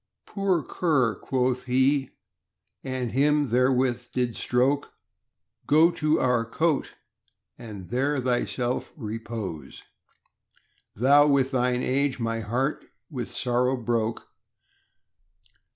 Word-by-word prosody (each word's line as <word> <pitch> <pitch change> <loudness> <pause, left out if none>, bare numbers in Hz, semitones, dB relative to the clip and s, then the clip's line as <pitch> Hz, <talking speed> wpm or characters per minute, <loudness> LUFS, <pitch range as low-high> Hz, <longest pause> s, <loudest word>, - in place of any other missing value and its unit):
Poor 190 -5 0
cur, 135 -11 +1
quoth 125 +4 -1
he, 130 +2 +2 0.7
and 130 -3 -3
him 145 +1 +2
therewith 125 0 +1
did 125 -3 -1
stroke, 130 +4 0 0.7
Go 160 +4 +5
to 155 -1 +1
our 125 -2 +2
cote 150 +6 -1 0.6
and 105 -6 -9
there 135 +3 0
thyself 125 0 -1
repose; 110 - -6 1.1
Thou 140 +6 +5
with 135 -2 +2
thine 125 -1 +1
age 135 0 0
my 115 -1 -1
heart 125 +7 -2 0.3
with 125 -5 -6
sorrow 125 +1 +1
broke. 115 -2 -2
125 Hz, 100 wpm, -26 LUFS, 120-140 Hz, 1.1 s, Go